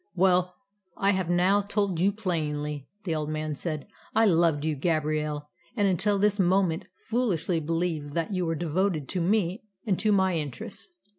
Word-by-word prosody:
"Well, 180 -1 +3 0.4
I 200 0 +3
have 190 -3 -1
now 185 +3 +4
told 200 -3 -1
you 195 +3 +4
plainly," 150 -8 -2 0.2
the 170 - -1
old 155 -1 -2
man 155 0 -2
said. 155 0 -4 0.3
"I 225 +1 +5
loved 165 -5 +3
you, 155 -1 0
Gabrielle, 150 -1 -1 0.3
and 205 -2 +3
until 195 +2 +2
this 205 +1 +2
moment 185 -1 +2 0.2
foolishly 195 -8 +1
believed 160 -2 -2
that 170 +4 -1
you 180 -2 0
were 165 - 0
devoted 170 -1 0
to 180 - -1
me 190 +1 +1 0.2
and 195 -5 +1
to 215 - +2
my 190 -3 +3
interests. 145 - -5
175 Hz, 165 wpm, -27 LUFS, 155-195 Hz, 0.4 s, I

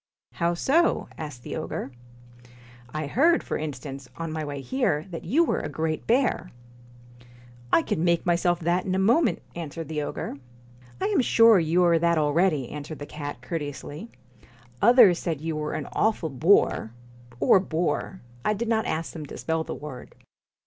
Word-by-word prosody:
* - - -69
How 170 +1 +2
so? 320 - +2
' - - -20
asked 145 -6 -7
the - - -5
ogre. 155 -3 -4 0.5
' 120 0 -21 0.3
I 155 0 -3
heard, 315 - +3
for - - -3
instance, 135 -3 -6
on 165 -1 -4
my 155 0 -3
way 145 -1 -5
here, 160 - 0
that 165 - -6
you 285 - +3
were - - 0
a - - -4
great 155 +2 -3
bear.' 240 -6 +1 0.7
* 120 0 -22
I 165 - +5
can 160 - -1
make 170 -1 +2
myself 175 0 +2
that 175 +2 +1
in 185 -1 -1
a - - +1
moment,' 230 - +2
answered 165 -1 -6
the 155 -1 -2
ogre. 145 - -5 0.6
'I 380 - -1
am 400 -8 +2
sure 230 -4 +6
you 170 +2 +2
are 170 -1 +4
that 170 0 +2
already,' 150 -2 +2
answered 150 +1 -7
the 145 - -7
cat 145 -4 -7
courteously. 150 - -6 0.4
' 120 +1 -27
Others 230 -7 +7
said 165 -5 -2
you 160 +1 -3
were 150 0 -3
an 145 - -3
awful 215 -7 0
bore 135 - +3 0.5
or 190 - +5
boar 175 0 -2 0.2
I 215 - +1
did 230 +2 -3
not 220 -2 +1
ask 160 +1 -3
them 155 -3 -7
to - - -9
spell 160 0 -1
the - - -6
word.' 140 -4 -9
160 Hz, 185 wpm, -26 LUFS, 145-185 Hz, 0.7 s, Others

